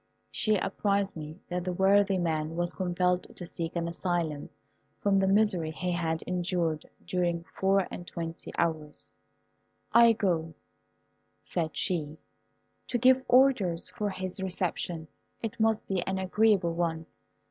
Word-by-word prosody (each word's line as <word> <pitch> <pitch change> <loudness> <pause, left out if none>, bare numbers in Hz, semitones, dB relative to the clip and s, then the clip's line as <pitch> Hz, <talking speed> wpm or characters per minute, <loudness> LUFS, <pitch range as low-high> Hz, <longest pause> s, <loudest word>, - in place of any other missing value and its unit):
She 215 -1 +2
apprized 200 +1 0
me 155 0 -7
that 180 0 -2
the 180 0 -2
worthy 195 +1 +4
man 160 -2 -1
was 175 0 -1
compelled 180 0 0
to 175 - -6
seek 165 0 -4
an 170 -1 -1
asylum 170 -3 -2 0.5
from 200 -1 +2
the 195 0 +3
misery 195 -5 +3
he 180 +3 -3
had 165 -2 -1
endured 175 -3 -1 0.2
during 175 -2 0
four 195 0 +2
and 175 - -7
twenty 165 -1 -6
hours. 155 -3 -2 0.8
"I 235 0 +8
go," 165 -7 -1 0.9
said 160 -3 -2
she, 160 -5 -1 0.7
"to 245 - 0
give 260 +1 +5
orders 245 -10 +4
for 210 -1 -2
his 190 0 -4
reception. 175 -3 -2 0.4
It 225 +1 -4
must 220 -1 +2
be 190 -2 0
an 190 0 0
agreeable 190 -2 +2
one. 165 -1 -1
180 Hz, 135 wpm, -29 LUFS, 165-195 Hz, 0.9 s, I